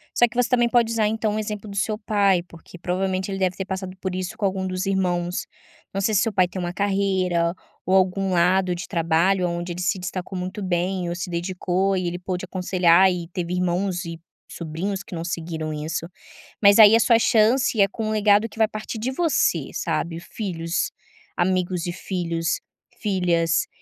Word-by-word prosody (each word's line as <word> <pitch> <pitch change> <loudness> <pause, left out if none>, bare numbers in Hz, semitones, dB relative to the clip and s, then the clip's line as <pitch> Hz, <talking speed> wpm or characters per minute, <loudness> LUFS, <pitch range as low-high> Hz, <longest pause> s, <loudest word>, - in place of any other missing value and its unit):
Só 240 - +5
que 230 - -15
você 245 -1 +2
também 240 -1 +3
pode 235 -2 +3
usar, 220 -2 +2
então, 215 -1 -1
o - - -1
exemplo 210 0 -5
do 200 - -8
seu 210 +1 0
pai, 200 -4 +2
porque 170 0 -14
provavelmente 185 +2 -1
ele 195 - -3
deve 185 -1 +1
ter 190 - -2
passado 190 -1 -5
por 190 -1 -2
isso 185 -1 -4
com 205 - -1
algum 190 -1 -1
dos 185 +1 -2
irmãos, 180 -2 -1 0.5
não 195 - -1
sei 215 +2 +1
se 200 - +4
seu 225 - 0
pai 185 -2 +4
tem 185 0 -6
uma 175 0 -3
carreira, 190 -4 +1 0.3
ou 190 - +2
algum 190 +1 +2
lado 180 +1 +3
de 175 - -6
trabalho, 175 +2 +2
aonde 175 0 -3
ele 180 - -6
se 190 +2 +1
destacou 185 +1 -5
muito 185 +3 -5
bem 180 0 -1
ou 175 - -3
se 175 +1 -5
dedicou 185 +2 -1
e 185 - -2
ele 175 +1 -3
pôde 180 0 -4
aconselhar, 185 0 +4
e 175 -2 -4
teve 175 0 -3
irmãos 180 +1 0
e 165 -1 -7 0.3
sobrinhos 180 +5 -4
que - - -12
não 165 - -4
seguiram 160 -2 -4
isso. 160 +2 -4 0.5
Mas 200 0 +6
aí 220 0 +9
a - - +5
sua 230 0 +4
chance 230 +1 +3
é 195 - +6
com 215 +2 -4
um - - -1
legado 210 +1 +3
que 210 - -16
vai 220 - +5
partir 215 +1 -6
de 245 +4 -2
você, 330 +3 +1
sabe, 165 0 -2
filhos, 170 -3 -3 0.5
amigos 180 -1 0
e - - -1
filhos, 170 -3 -2 0.4
filhas, 175 -4 +1
185 Hz, 200 wpm, -23 LUFS, 175-200 Hz, 0.5 s, aí